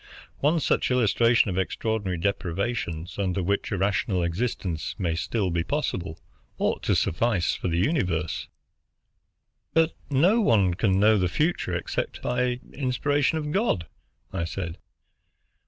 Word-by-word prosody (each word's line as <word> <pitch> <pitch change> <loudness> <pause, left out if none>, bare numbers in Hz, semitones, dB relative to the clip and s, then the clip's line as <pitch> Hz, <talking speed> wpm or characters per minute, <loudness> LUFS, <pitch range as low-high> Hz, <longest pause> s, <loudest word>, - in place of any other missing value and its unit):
One 155 +4 +3
such - - +1
illustration 120 -2 +3
of - - -1
the - - +4
extraordinary 105 -2 -2
deprivations 95 -1 -2
under 95 -1 0
which 100 +5 -1
a 100 - 0
rational 95 -1 +1
existence 85 -2 -2
may 85 -4 0
still 95 +3 -1
be 85 0 0
possible 95 - -2 0.4
ought - - 0
to - - +3
suffice 95 -1 +1
for - - -3
the 85 -1 0
universe." 90 - 0 1.3
"But 165 0 +3
no 175 - +4
one 100 - +3
can 95 0 +2
know 105 +1 +5
the 90 - +2
future 150 - 0
except 85 - -3
by 125 0 0
inspiration 145 +3 +1
of 150 -1 -3
God," 190 - +1 0.5
I 90 -3 -1
said. 85 -1 -5
100 Hz, 140 wpm, -26 LUFS, 90-125 Hz, 1.3 s, know